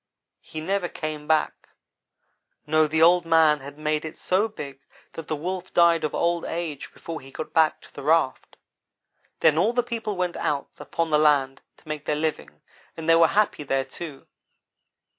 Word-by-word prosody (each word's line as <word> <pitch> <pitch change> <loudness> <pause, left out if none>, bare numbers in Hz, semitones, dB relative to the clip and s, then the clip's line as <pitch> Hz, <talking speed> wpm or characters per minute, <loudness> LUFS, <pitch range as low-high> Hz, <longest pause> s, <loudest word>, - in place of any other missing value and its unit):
He 155 - -8
never 185 +1 -1
came 155 -1 -5
back 155 -1 0 1.0
no, 155 +1 +3
the 160 +1 +2
Old 175 +1 +6
man 160 -2 +4
had 140 +1 -10
made 155 0 -1
it 155 0 -7
so 195 +4 +1
big 140 -11 -9 0.3
that 165 - -8
the 155 - -1
Wolf 180 +5 -5
died 170 -1 +5
of 155 - -2
old 170 0 +1
age 165 -4 -5
before 165 -1 -8
he 135 - -13
got 155 - -7
back 160 -1 +3
to - - -18
the - - -8
raft. 155 -1 +1 0.8
Then 160 -1 +4
all 215 +7 +2
the 245 0 +1
people 225 -3 -4
went 180 -1 -2
out 140 -1 -2
upon 165 -1 -3
the 150 - +4
land 140 -3 +2 0.2
to - - -24
make 155 -1 -5
their 150 - 0
living, 150 - -3 0.4
and 165 -1 -6
they 165 - +6
were 165 0 +6
happy, 210 -3 +1
there, 135 -2 -1
too. 140 +1 -9
160 Hz, 180 wpm, -25 LUFS, 150-170 Hz, 1.0 s, Old